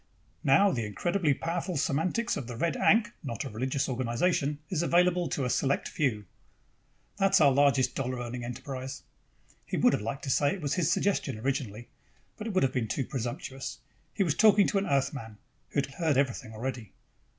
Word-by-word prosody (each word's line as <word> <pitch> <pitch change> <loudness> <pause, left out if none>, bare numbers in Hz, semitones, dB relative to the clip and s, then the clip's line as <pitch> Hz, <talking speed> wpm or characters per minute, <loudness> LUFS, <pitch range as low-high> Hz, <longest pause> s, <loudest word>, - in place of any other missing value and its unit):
Now 165 +9 +5
the 120 -8 -1
incredibly 150 - 0
powerful 170 +2 -3
semantics 180 - 0
of 120 - -5
the 120 - -6
Red 165 +1 0
Ankh 215 0 +3
(not 120 -7 -4
a - - -5
religious 130 +5 -1
organization) 130 +4 0
is 170 -1 -1
available 175 0 +3
to 135 - -1
a - - -1
select 140 0 +1
few 115 -9 -1 0.5
' - - -40
That's 195 -1 +4
our 145 -3 +6
largest 140 -1 +3
dollar 130 -1 -2
earning 120 0 -5
enterprise." 130 +2 -6 0.6
He - - -4
would - - +4
have - - 0
liked 115 +6 -4
to 135 - -1
say 145 +6 +2
it 190 - -9
was 145 -2 -1
his 175 -5 +1
suggestion 155 - 0
originally, 120 -2 -3 0.5
but 215 - -6
it 220 - -3
would 185 - +3
have 135 -1 +1
been 120 -4 -1
too 130 +5 -2
presumptuous. 130 +1 -5 0.3
He 200 - +1
was 165 -6 +1
talking 210 0 +5
to 200 - +1
an 195 - -3
Earthman, 135 -5 -1 0.3
who - - -22
had - - -4
heard 155 -3 +1
everything 130 -5 0
already. 115 -1 -5
135 Hz, 190 wpm, -29 LUFS, 125-170 Hz, 0.6 s, our